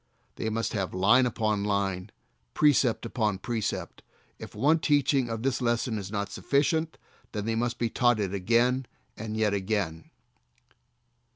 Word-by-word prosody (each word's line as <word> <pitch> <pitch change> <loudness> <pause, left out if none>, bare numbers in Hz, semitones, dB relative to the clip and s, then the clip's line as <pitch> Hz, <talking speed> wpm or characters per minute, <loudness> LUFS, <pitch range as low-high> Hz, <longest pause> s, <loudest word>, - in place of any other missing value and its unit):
They 110 - -2
must 115 +1 -2
have 95 -4 -2
"line 120 +7 +5
upon 110 -3 -1
line, 100 -2 -1 0.5
precept 135 -6 +3
upon 110 -4 -1
precept." 110 +2 -3 0.4
If - - -10
one 150 +9 +3
teaching 140 -4 +2
of 115 0 -4
the 135 -1 +1
lesson 115 -1 0
is 95 -1 -6
not 100 -1 -3
sufficient 155 +8 0 0.4
then 105 -2 -3
they 115 - 0
must 120 +1 -1
be 115 -2 -1
taught 120 -3 +3
it 100 -2 -2
again 120 +6 +2 0.3
and 110 -1 -5
yet 105 -2 +2
again. 95 -5 -2
110 Hz, 150 wpm, -28 LUFS, 100-125 Hz, 0.5 s, line